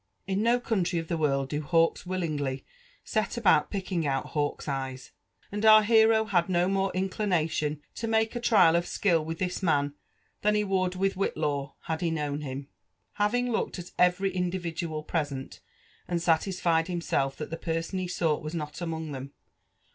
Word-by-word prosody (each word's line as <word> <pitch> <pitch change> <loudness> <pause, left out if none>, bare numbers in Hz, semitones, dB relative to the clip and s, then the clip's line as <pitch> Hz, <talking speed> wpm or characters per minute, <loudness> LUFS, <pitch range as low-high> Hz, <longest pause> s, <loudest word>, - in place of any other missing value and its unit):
In 195 +1 -1
no 235 +2 +3
country 190 -7 0
of 165 -1 -3
the 170 - 0
world 135 -3 +1
do 150 +1 -2
hawks 165 +3 +2
willingly 150 -7 -2 0.4
set 215 -1 -1
abottt 190 -9 +4
ptek» 195 -2 -3
tag 170 -4 0
out 135 -1 0
hawks' 145 -2 -2
^yes; 135 -2 -4 0.4
and 205 +1 -3
our 215 0 +8
hero 220 0 +5
had 185 -4 +1
no 175 0 +2
more 195 0 +1
inelination 165 -6 0
to 230 - -4
make 220 +1 +1
a - - -1
trial 215 -8 +5
of 175 +1 +1
skill 170 -6 +2
with 165 +1 -4
this 180 +2 -2
raan» 145 -5 +1 0.5
than 210 0 +3
he 210 - +2
Would 185 -2 0
with 195 +1 +1
WbitlaW 150 -7 -2
had 160 -1 -3
he 170 - +1
known 150 -2 -2
him. 135 -1 -6 0.5
Having 245 +4 +2
looked 220 - -1
at 175 0 -8
every 180 +2 +3
individual 175 -3 -3
present, 145 -5 -3 0.5
and 175 -1 0
satisfied 165 0 +1
himself 155 -6 -1
(hat 150 - -6
the - - -2
person 165 +3 -2
he 185 - -2
sought 165 -4 0
was 155 +2 -5
not 150 0 -5
among 160 -2 -4
them. 135 0 -7
170 Hz, 175 wpm, -28 LUFS, 150-195 Hz, 0.5 s, our